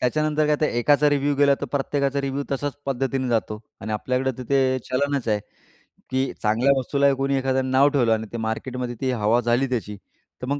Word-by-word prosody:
त्याच्यानंतर 155 +4 +1
काय 150 0 +2
तर 155 - +3
एकाचा 145 +5 +3
रिव्ह्यू 145 0 +1
गेला 140 0 +4
तर - - -3
प्रत्येकाचा 140 0 0
रिव्ह्यू 140 +1 -3
तसाच 145 +1 -2
पद्धतीने 135 0 -1
जातो. 110 -2 -1 0.2
आणि 110 - -4
आपल्याकडे 130 +4 -1
तर - - -4
ते 130 -1 +3
चलनच 140 -1 0
आहे 105 -1 +1 0.7
की 130 0 0
चांगल्या 115 +5 +3
वस्तूला 140 +2 +2
कोणी 135 +1 0
एखाद्यानं 130 0 0
नाव 135 +2 +5
ठेवलं 125 -6 +2
आणि 110 0 -2
ते 115 - -3
मार्केटमध्ये 120 +2 -3
ती 130 -1 0
हवा 115 0 +2
झाली 120 +3 +1
त्याची 105 -4 -3 0.4
तर - - -3
मग 140 +2 -1
130 Hz, 195 wpm, -23 LUFS, 120-140 Hz, 0.7 s, नाव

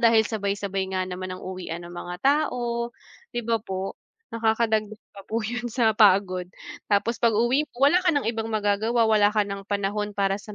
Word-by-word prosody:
dahil 230 -2 +5
sabay-sabay 200 -2 -2
nga 185 0 0
naman 185 0 -5
ang 185 - -10
uwian 185 -2 -6
ng 175 - -10
mga 175 0 -6
tao, 245 -5 +1 0.5
'di 240 - 0
ba, 230 -1 +2
po. 190 -1 -4 0.4
Naka-kadagdag 220 -2 0
pa 195 - -12
po 225 0 -2
yun 240 +2 -3
sa 235 -1 +2
pagod, 190 -4 +4 0.4
tapos 210 +3 +1
pag-uwi 240 +6 +2
mo, - - -41 0.2
wala 360 - +5
ka 360 -3 +2
ng 285 - +1
ibang 225 -1 -3
magagawa, 215 +2 +1
wala 215 -2 +4
ka 210 - +4
ng 200 -1 -6
panahon 205 +1 -2
para 195 0 +1
sa 210 0 -10
215 Hz, 180 wpm, -25 LUFS, 195-230 Hz, 0.5 s, dahil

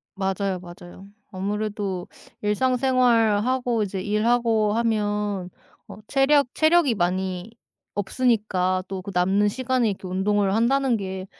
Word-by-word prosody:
맞아요, 195 -1 -1
맞아요. 175 +1 -12 0.2
아무래도 200 -1 -3 0.3
일상생활하고 245 0 +2
이제 195 -2 -3
일하고 220 +1 +1
하면 210 -4 -1 0.4
어 - - -11
체력 280 +1 +3
체력이 315 -5 +3
많이 185 +1 -2 0.4
없으니까 200 -4 0
또 190 -1 -5
그 200 - -7
남는 190 +4 +2
시간에 255 0 0
이렇게 190 -1 -7
운동을 195 +1 +1
한다는 250 +2 +2
게 190 -2 -5
210 Hz, 275 characters per minute, -24 LUFS, 190-235 Hz, 0.4 s, 체력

